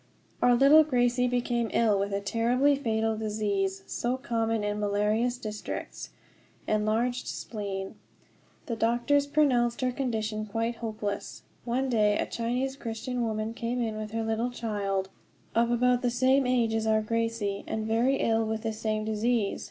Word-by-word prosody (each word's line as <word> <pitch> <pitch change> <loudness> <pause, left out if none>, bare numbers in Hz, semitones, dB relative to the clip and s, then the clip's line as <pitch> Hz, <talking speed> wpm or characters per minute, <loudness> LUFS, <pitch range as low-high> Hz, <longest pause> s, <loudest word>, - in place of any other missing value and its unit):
Our 245 0 +5
little 280 +5 +7
Gracie 250 -3 +2
became 240 -2 0
ill 215 -4 +3
with 200 +1 -1
a 200 0 -1
terribly 245 +7 +2
fatal 225 -4 0
disease, 205 -3 -1
so 245 +2 -2
common 225 -3 -1
in 205 0 -1
malarious 210 +4 +1
districts 215 -4 -6 0.6
enlarged 220 +4 0
spleen. 195 -3 -5 0.7
The 230 - -3
doctors 240 +6 +2
pronounced 260 -5 +2
her 255 0 +1
condition 220 -5 -2
quite 230 +2 -2
hopeless. 215 -3 -4 0.2
One 250 +3 0
day 210 -4 +3
a - - 0
Chinese 250 +3 -2
Christian 245 0 -4
woman 220 -1 -2
came 235 +1 -3
in 225 -3 -1
with 215 0 -5
her 225 +1 -2
little 225 +2 -1
child, 200 -5 -2 0.4
of 235 +1 +2
about 245 +1 +2
the 245 - +1
same 260 +2 +3
age 240 -3 +2
as 220 0 0
our 220 0 +3
Gracie, 230 -3 -1
and 220 0 -2
very 230 +5 +2
ill 225 -3 +1
with 220 0 -3
the 225 -1 -1
same 215 0 -2
disease. 220 -1 0
230 Hz, 155 wpm, -28 LUFS, 215-245 Hz, 0.7 s, little